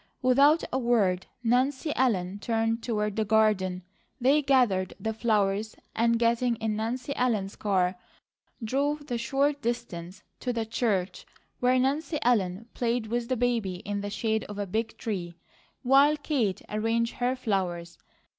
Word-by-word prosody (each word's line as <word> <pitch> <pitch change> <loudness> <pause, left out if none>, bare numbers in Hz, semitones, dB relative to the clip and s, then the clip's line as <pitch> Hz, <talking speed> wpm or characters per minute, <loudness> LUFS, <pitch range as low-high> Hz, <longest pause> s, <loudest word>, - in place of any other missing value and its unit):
Without 280 +5 +5
a 265 - +1
word 205 -7 +1 0.2
Nancy 260 +6 +1
Ellen 200 -7 0
turned 225 +1 0
toward 210 -3 -1
the 220 - +1
garden. 205 -4 +2 0.4
They 275 +4 +4
gathered 245 -10 +2
the 220 0 -2
flowers 215 -2 0 0.2
and 230 +1 +3
getting 235 +1 +2
in 220 -1 -2
Nancy 245 +5 -3
Ellen's 215 -6 0
car 185 -3 0 0.7
drove 285 +5 -1
the 245 -5 -3
short 280 +4 0
distance 205 -7 -4 0.2
to 250 - -2
the 230 -2 -2
church 210 -5 -1 0.3
where 250 +1 +3
Nancy 285 +5 0
Ellen 210 -3 +1
played 235 -1 -1
with 235 +2 -2
the 255 - 0
baby 230 -6 0
in 200 +3 -4
the 205 - -4
shade 220 +1 -1
of 205 - -8
a 205 - -2
big 220 +4 -3
tree 180 -6 -4 0.5
while 275 +4 +5
Kate 265 - -1
arranged 225 +2 -1
her 250 +1 +1
flowers. 180 -8 -2
230 Hz, 145 wpm, -27 LUFS, 205-250 Hz, 0.7 s, Without